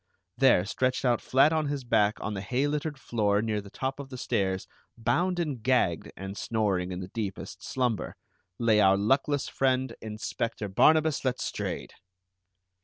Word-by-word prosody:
There, 130 -9 +4
stretched 130 +5 0
out 120 -1 +2
flat 135 +4 +4
on 155 -2 +1
his 140 -2 -3
back 110 -3 +2
on 110 - -3
the 95 - -4
hay 125 +7 0
littered 150 0 -2
floor 105 -5 +1
near 110 -1 -1
the 100 - -12
top 135 +6 -4
of 140 -1 -7
the 130 - -7
stairs, 95 -5 -1 0.3
bound 180 +10 +1
and 150 -8 -2
gagged, 105 -9 +1
and 95 +1 -6
snoring 100 -5 -1
in 90 0 -4
the 90 - -7
deepest 105 -5 -5
slumber, 125 -5 -1 0.4
lay 115 -3 +3
our 95 0 +5
luckless 135 +7 +1
friend, 130 -1 0
Inspector 110 0 -4
Barnabas 155 +9 +4
Letstrayed! 130 -1 -3
120 Hz, 160 wpm, -28 LUFS, 105-135 Hz, 0.4 s, our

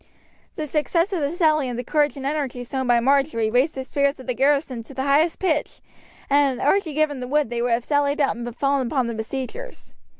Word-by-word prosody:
The 310 - -3
success 335 +6 0
of 365 - 0
the 285 -2 0
sally 310 -5 +2
and 240 - -4
the 245 - -3
courage 295 +2 +1
and 270 - -6
energy 275 -4 -2
shown 260 +1 -3
by 240 -1 +4
Marjory 265 -3 +1
raised 255 +6 +2
the 265 - -4
spirits 280 +1 0
of 260 - -10
the 250 - -1
garrison 275 -2 +1
to 275 - -12
the 265 - -2
highest 295 +4 +2
pitch; 320 -6 -1 0.5
and 280 -3 +2
had - - -1
Archie 335 -1 +2
given 300 -3 +1
the 250 - -5
word 290 -2 0
they 235 -1 -2
would 245 - 0
have 235 +1 -1
sallied 285 0 +1
out 280 -7 +2
and 240 0 -6
fallen 275 -2 +1
upon 260 0 0
the 235 - -3
besiegers. 265 - -6
275 Hz, 230 wpm, -23 LUFS, 250-300 Hz, 0.5 s, by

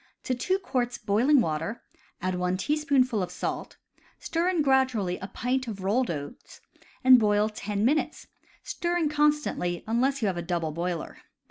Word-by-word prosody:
To 255 - -1
two 365 +10 0
quarts 250 -10 -2
boiling 245 +7 +3
water 165 +5 -3 0.4
add 185 0 0
one 180 0 -1
teaspoonful 270 -3 +1
of 180 - -2
salt, - - -4 0.4
stir 340 +2 -1
in 345 -5 +1
gradually 260 -9 +2
a 190 - -6
pint 250 +5 -2
of 200 -4 -6
rolled 235 +6 +1
oats, 145 -3 -7 0.4
and 255 -1 +8
boil 210 -1 +2
ten 210 -1 -2
minutes, 300 +5 0 0.4
stirring 345 -3 -1
con 300 0 +4
stantly, 180 -12 -3
unless 255 +4 0
you - - +3
have 185 -3 -1
a - - -2
double 170 -2 -2
boiler. 170 +1 -4
235 Hz, 160 wpm, -27 LUFS, 185-275 Hz, 0.4 s, and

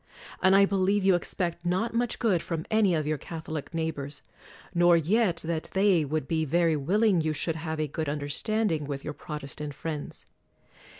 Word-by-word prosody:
And 190 +1 +5
I 200 0 +7
believe 195 +1 +1
you 195 - +6
expect 175 -1 -1
not 185 +7 0
much 240 0 0
good 200 -8 +2
from 165 -2 -4
any 210 -5 +4
of 155 -2 -1
your 155 -1 -1
Catholic 160 -3 -6
neigh 160 -1 -1
bors; 145 0 -8 0.5
nor 175 -1 +5
yet 180 +2 +2
that 160 -1 -3
they 190 -4 +4
would 150 -1 -2
be 160 -1 0
very 165 +2 +2
willing 190 +5 +2
you 155 0 0
should 160 +2 -2
have 160 -1 -4
a 155 - +1
good 155 +1 -3
understanding 155 +4 -1
with 140 -1 -5
your - - -4
Protestant 150 -2 -6
friends. 155 -1 -5
165 Hz, 180 wpm, -28 LUFS, 155-190 Hz, 0.5 s, I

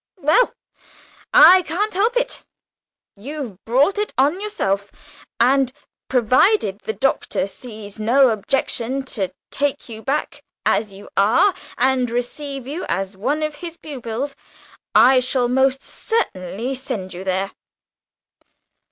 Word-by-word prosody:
"Well, 320 - +3 0.8
I 370 0 +8
can't 370 +6 -2
help 440 +6 +1
it. - - -1 0.7
You've 245 -3 -7
brought 280 - +2
it 420 - -1
on 295 +8 +2
yourself; 200 - -2 0.5
and, 260 +1 +3 0.4
provided 255 - +3
the 220 +1 -4
Doctor 270 -6 0
sees 215 0 -10
no 250 +5 +4
objection 245 +3 -1
to 195 -5 -2 0.2
take 285 -3 -1
you 220 -1 -8
back 275 +5 -3 0.2
as 210 -2 +1
you 195 +1 -12
are 220 - +4 0.2
and 255 -1 +2
receive 265 +3 -4
you 300 +7 -5
as 190 +2 -2
one 275 +10 -1
of 305 0 -2
his 340 -1 -7
pupils, 270 -2 -5 0.6
I 250 +5 +7
shall 255 0 0
most 265 +2 +2
certainly 235 - -3
send 220 -8 -4
you 180 +2 -7
there." 190 +1 -1
255 Hz, 125 wpm, -21 LUFS, 215-295 Hz, 0.8 s, I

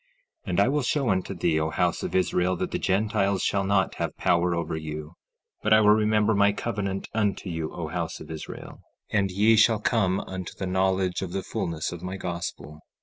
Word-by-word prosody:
16:12 - - -4
And 90 - +1
I 100 - +5
will 145 +3 +1
show 135 0 0
unto 95 +1 -1
thee, 85 -2 +1
O 80 0 0
house - - 0
of - - -4
Israel, 90 0 +2
that - - -3
the - - -1
Gentiles 100 -1 +1
shall 100 -1 +1
not 95 -1 +1
have - - -3
power 85 0 +2
over 85 -1 -2
you; 75 0 -6 0.5
but 110 - +3
I 110 - +7
will 105 -1 +6
remember 105 0 +3
my 100 0 +4
covenant 100 -4 -3
unto 105 -4 -1
you, 80 -2 -3
O - - -5
house - - -4
of - - -10
Israel, 80 -1 -8 0.3
and 100 -2 +2
ye 105 +4 +4
shall 110 0 +5
come 100 -4 +1
unto 95 -2 -6
the 95 - -3
knowledge 95 0 +1
of 90 -2 -5
the 95 -1 -2
fulness 80 -3 -3
of 85 -1 -7
my 90 +1 -5
gospel. 85 -4 -5
95 Hz, 205 wpm, -26 LUFS, 85-105 Hz, 0.5 s, I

